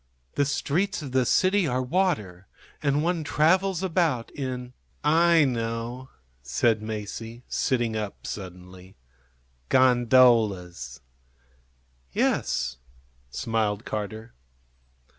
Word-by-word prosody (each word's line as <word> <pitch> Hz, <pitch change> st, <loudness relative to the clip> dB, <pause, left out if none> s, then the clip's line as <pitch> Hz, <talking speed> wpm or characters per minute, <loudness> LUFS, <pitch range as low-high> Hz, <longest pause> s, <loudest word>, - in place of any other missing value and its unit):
The 145 Hz, -, +1 dB
streets 155 Hz, +6 st, -1 dB
of 135 Hz, -, -7 dB
the 130 Hz, -1 st, +2 dB
city 190 Hz, -, +3 dB
are 125 Hz, -1 st, 0 dB
water, 115 Hz, -, -1 dB, 0.3 s
and 145 Hz, 0 st, +1 dB
one 170 Hz, -1 st, 0 dB
travels 180 Hz, +5 st, +2 dB
about 165 Hz, -10 st, 0 dB
in 125 Hz, -2 st, -5 dB, 0.2 s
" -, -, -39 dB, 0.3 s
"I 165 Hz, -3 st, +6 dB
know," 120 Hz, +1 st, -3 dB, 0.3 s
said 105 Hz, -, +1 dB
Masie, 110 Hz, +2 st, -6 dB
sitting 120 Hz, -3 st, 0 dB
up 105 Hz, -2 st, -5 dB
suddenly. 90 Hz, -1 st, -9 dB, 0.7 s
"Gondolas." 115 Hz, -, +3 dB, 1.1 s
"Yes," 65 Hz, +2 st, 0 dB, 0.5 s
smiled 110 Hz, -, -1 dB
Carter. 110 Hz, -, -5 dB
120 Hz, 95 wpm, -26 LUFS, 105-145 Hz, 1.1 s, I